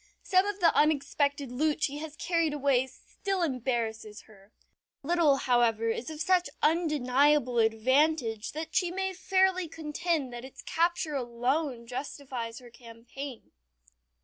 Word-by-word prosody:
Some 375 Hz, +1 st, +3 dB
of 410 Hz, -1 st, -3 dB
the 335 Hz, -3 st, +4 dB
unexpected 285 Hz, -2 st, +1 dB
loot 300 Hz, +4 st, 0 dB
she 290 Hz, +1 st, -1 dB
has 310 Hz, -1 st, -7 dB
carried 335 Hz, -2 st, 0 dB
away 270 Hz, -3 st, +2 dB
still 380 Hz, +8 st, -4 dB
embarrasses 235 Hz, -6 st, -2 dB
her. 200 Hz, -1 st, -20 dB, 0.5 s
Not 345 Hz, +5 st, 0 dB
a -, -, +3 dB
little, 290 Hz, -4 st, +5 dB
however, 235 Hz, -4 st, +2 dB
is 230 Hz, +4 st, -3 dB
of 310 Hz, -1 st, -7 dB
such 360 Hz, +2 st, +2 dB
undeniable 295 Hz, -5 st, +3 dB
advantage 230 Hz, +1 st, +2 dB
that 315 Hz, +2 st, -6 dB
she 360 Hz, -, +2 dB
may 380 Hz, +1 st, -2 dB
fairly 375 Hz, -1 st, +2 dB
contend 315 Hz, -3 st, -2 dB
that 240 Hz, 0 st, -7 dB
its 265 Hz, -, -11 dB
capture 335 Hz, -2 st, 0 dB
alone 250 Hz, +1 st, -1 dB
justifies 250 Hz, -2 st, -5 dB
her 245 Hz, -2 st, -13 dB
campaign. 240 Hz, +3 st, -10 dB
280 Hz, 140 wpm, -29 LUFS, 240-325 Hz, 0.5 s, little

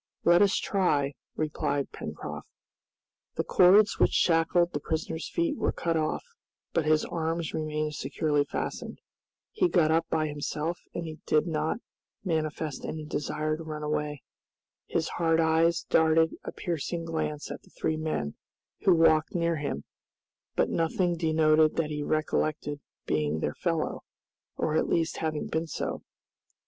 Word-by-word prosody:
"Let 175 Hz, +1 st, +6 dB
us 200 Hz, -1 st, +4 dB
try," 145 Hz, -8 st, +1 dB, 0.2 s
replied 145 Hz, -2 st, -1 dB
Pencroft. -, -, -7 dB, 0.9 s
The -, -, 0 dB
cords 200 Hz, +3 st, +5 dB
which -, -, +5 dB
shackled 170 Hz, +1 st, +3 dB
the 145 Hz, -, -1 dB
prisoner's 160 Hz, +2 st, -3 dB
feet 335 Hz, -3 st, 0 dB
were -, -, +1 dB
cut 165 Hz, -1 st, -1 dB
off, 155 Hz, -1 st, 0 dB, 0.5 s
but 160 Hz, -2 st, +1 dB
his 155 Hz, 0 st, +3 dB
arms 165 Hz, -1 st, -2 dB
remained 155 Hz, -1 st, -2 dB
securely 145 Hz, +1 st, 0 dB
fastened. 145 Hz, -, -4 dB, 0.5 s
He 370 Hz, -5 st, +2 dB
got 160 Hz, -, +3 dB
up 165 Hz, +1 st, +2 dB
by 155 Hz, -1 st, +1 dB
himself 150 Hz, +3 st, -3 dB, 0.2 s
and 160 Hz, -2 st, -5 dB
did 155 Hz, -, +3 dB
not 160 Hz, +6 st, -1 dB, 0.4 s
manifest 155 Hz, -4 st, -2 dB
any 155 Hz, -1 st, -4 dB
desire 150 Hz, +1 st, -2 dB
to 165 Hz, -, -7 dB
run 155 Hz, -1 st, -5 dB
away. 150 Hz, -1 st, -2 dB, 0.6 s
His 165 Hz, -1 st, 0 dB
hard 165 Hz, -1 st, +1 dB
eyes 165 Hz, +1 st, +3 dB
darted 160 Hz, 0 st, +3 dB
a -, -, -5 dB
piercing 170 Hz, 0 st, -3 dB
glance 155 Hz, -2 st, -3 dB
at -, -, -6 dB
the -, -, -22 dB
three 155 Hz, -, -1 dB
men, 155 Hz, -, -2 dB, 0.5 s
who 185 Hz, -, +7 dB
walked 160 Hz, -1 st, +4 dB
near 170 Hz, -1 st, +1 dB
him, 140 Hz, -, -3 dB, 0.7 s
but -, -, +2 dB
nothing 170 Hz, +2 st, +1 dB
denoted 155 Hz, -1 st, +3 dB
that 155 Hz, -2 st, 0 dB
he 150 Hz, 0 st, -2 dB
recollected 155 Hz, -1 st, -1 dB, 0.3 s
being 75 Hz, 0 st, 0 dB
their -, -, -1 dB
fellow, -, -, -1 dB, 0.6 s
or 155 Hz, -, 0 dB
at -, -, +1 dB
least 165 Hz, -1 st, +1 dB
having 155 Hz, -2 st, -2 dB
been 160 Hz, +1 st, -2 dB
so. -, -, -3 dB
160 Hz, 145 wpm, -28 LUFS, 150-165 Hz, 0.9 s, who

